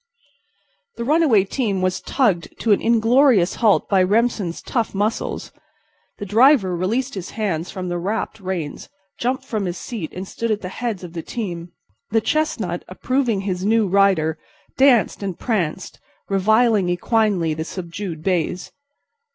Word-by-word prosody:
The 235 - -3
runaway 280 - +4
team 200 -3 -1
was 185 0 0
tugged 210 -11 0
to 225 - +1
an 205 - +4
inglorious 230 -3 +3
halt 215 -3 +4
by 195 -2 +3
Remsen's 205 -2 +1
tough 230 -5 -2
muscles. 210 +3 -2 0.7
The 205 - -6
driver 220 -3 +4
released 230 +10 -1
his 185 -3 -6
hands 185 -7 -2
from 185 -2 -5
the 175 0 -2
wrapped 215 +4 -3
reins, 180 -6 -5 0.3
jumped 260 +2 -1
from 215 -6 -2
his 175 -1 -3
seat 210 -8 -6
and 185 +1 -7
stood 230 +4 -3
at 215 -1 0
the 185 - -5
heads 220 -2 -4
of 170 -2 -8
the 165 - -4
team. 175 -5 -5 0.4
The 225 - +3
chestnut, 220 - -1
approving 240 +1 -1
his 185 -2 -3
new 220 +1 +3
rider, 185 -5 +2 0.4
danced 260 -7 +4
and 195 -3 -4
pranced, 190 -7 -2 0.3
reviling 215 +1 +3
equinely 185 -3 +1
the 160 - -3
subdued 170 -1 -6
bays. 180 -1 -1
200 Hz, 150 wpm, -21 LUFS, 180-230 Hz, 0.7 s, runaway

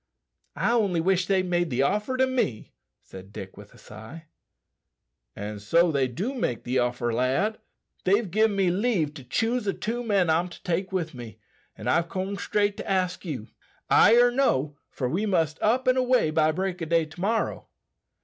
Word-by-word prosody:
"I 190 +10 +1
only 205 -8 +2
wish 180 +1 +1
they'd 190 -2 +1
made 175 -1 0
the 130 0 +1
offer 210 - 0
to 260 - +4
me," 250 - -2 0.3
said 95 +1 -12
Dick 95 -2 -9
with 105 0 -13
a - - -18
sigh. 110 +10 -11 1.1
"An' 105 +1 -6
so 165 +12 +3
they 135 -3 +1
do 185 - -3
make 125 - -2
the 130 +1 0
offer, 120 -1 -1
lad. 135 - 0 0.4
They've 200 0 +1
gin 215 +1 +2
me 190 -3 +2
leave 185 -6 0
to 140 - -10
choose 225 - -1
the 195 - -1
two 240 +3 -3
men 200 -6 +2
I'm 165 +3 +1
to - - -13
take 180 +1 -2
with 175 -4 -2
me, 120 -3 -9 0.4
and - - -7
I've 170 +1 +2
corned 195 +2 -3
straight 205 -1 0
to - - -6
ask 185 -1 -1
you. 130 -10 -5 0.4
Ay 230 - +7
or 245 0 +5
no, 155 - +1
for 130 - -3
we 190 +11 -1
must 165 -6 0
up 250 +5 +1
an' 255 0 +4
away 255 -10 +2
by 155 0 +3
break 185 +2 -3
o' - - -1
day 165 0 +2
to 160 +3 -12
morrow." 220 +4 -1
180 Hz, 190 wpm, -26 LUFS, 140-210 Hz, 1.1 s, Ay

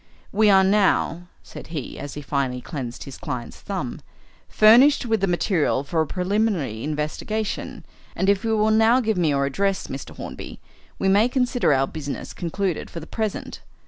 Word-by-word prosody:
"We 210 +1 +4
are 190 -1 +6
now," 190 -3 +2 0.2
said - - -10
he, 155 -5 -6
as 145 -1 -7
he 150 - -6
finally 135 -3 -1
cleansed 125 -3 -6
his 135 - -10
client's 120 -2 -6
thumb, 185 -12 -4 0.5
"furnished 245 +6 +6
with 225 -3 0
the 195 - +2
material 175 -6 +1
for 160 +3 0
a 160 - -1
preliminary 180 - -1
investigation, 155 +8 -3 0.3
and 190 - 0
if 200 -1 +3
you 225 -1 +1
will 215 +1 +3
now 225 +3 +5
give 220 -5 0
me 170 -3 +2
your 140 -1 +1
address, 195 +8 -1
Mr. 135 - -7
Hornby, - - -8 0.4
we 195 - 0
may 205 +5 +4
consider 250 - +1
our 135 -1 +3
business 145 0 -6
concluded 180 0 -3
for 170 - -7
the 160 - -9
present. 215 +2 -4
185 Hz, 175 wpm, -23 LUFS, 145-215 Hz, 0.5 s, are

